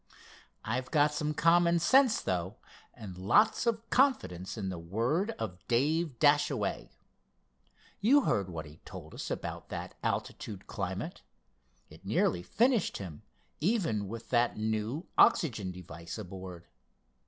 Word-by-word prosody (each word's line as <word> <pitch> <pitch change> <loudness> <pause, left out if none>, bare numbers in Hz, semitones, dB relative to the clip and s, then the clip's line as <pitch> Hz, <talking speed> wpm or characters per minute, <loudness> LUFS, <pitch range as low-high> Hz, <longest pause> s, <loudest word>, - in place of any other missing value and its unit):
"I've 125 +3 -2
got 150 -1 +3
some 150 0 -2
common 170 +2 +4
sense, 255 - +4
though, 90 +2 -2 0.4
and 105 -6 -9
lots 205 - +3
of 225 0 0
confidence 120 - +1
in 100 -3 -3
the 90 -2 -5
word 115 - 0
of 90 -5 -5
Dave 145 +3 +1
Dashaway. 145 -7 +2 1.1
You 265 +8 +5
heard 100 - 0
what 80 -3 -6
he 75 +1 -13
told - - -11
us - - -6
about - - -5
that - - -5
altitude 100 -4 -3
climate. - - -4 0.7
It - - -15
nearly 85 - +1
finished 230 - +1
him, 85 -7 -8 0.4
even 160 - 0
with 115 +3 -8
that 120 -1 +2
new 110 - -2
oxygen 110 - +4
device 85 -1 -8
aboard. 95 -3 -8
115 Hz, 130 wpm, -31 LUFS, -, 1.1 s, You